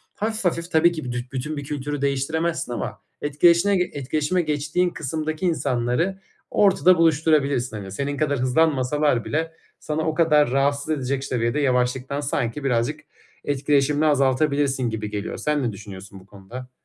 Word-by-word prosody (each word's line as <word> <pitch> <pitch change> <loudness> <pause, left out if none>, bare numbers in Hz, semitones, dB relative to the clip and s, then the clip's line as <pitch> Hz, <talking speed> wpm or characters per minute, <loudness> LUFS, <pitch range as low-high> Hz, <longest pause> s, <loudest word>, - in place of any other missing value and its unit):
hafif 220 -1 -3
hafif 170 0 -1
tabii 170 +1 +5
ki 160 -2 -5
büdü 120 -1 -3
bütün 140 +3 -4
bir 145 - -4
kültürü 145 0 -4
değiştiremezsin 140 +3 -1
ama - - -5 0.2
etkileşine 170 +7 +4 0.2
etkileşime 150 +5 0
geçtiğin 155 +3 0
kısımdaki 155 +4 -3
insanları 145 +3 0 0.3
ortada 185 -2 +4
buluşturabilirsin. 150 -7 +2
Hani, 95 -2 -8
senin 140 +5 -3
kadar 145 -2 0
hızlanmasalar 135 -1 +1
bile 160 +1 -2 0.3
sana 155 +1 -3
o 160 - 0
kadar 150 -5 +4
rahatsız 140 +2 0
edecek 135 -3 -1
ş - - -5
seviyede 120 +2 0
yavaşlıktan 130 +1 0
sanki 135 -1 -2
birazcık 130 +4 0 0.5
etkileşimini 145 +1 +1
azaltabilirsin 140 -2 +2
gibi 110 -1 -4
geliyor. 105 -1 -4
Sen 150 -2 0
ne 120 - 0
düşünüyorsun 100 -1 -10
bu 95 - -18
konuda? 105 +6 -10
145 Hz, 145 wpm, -23 LUFS, 125-155 Hz, 0.5 s, tabii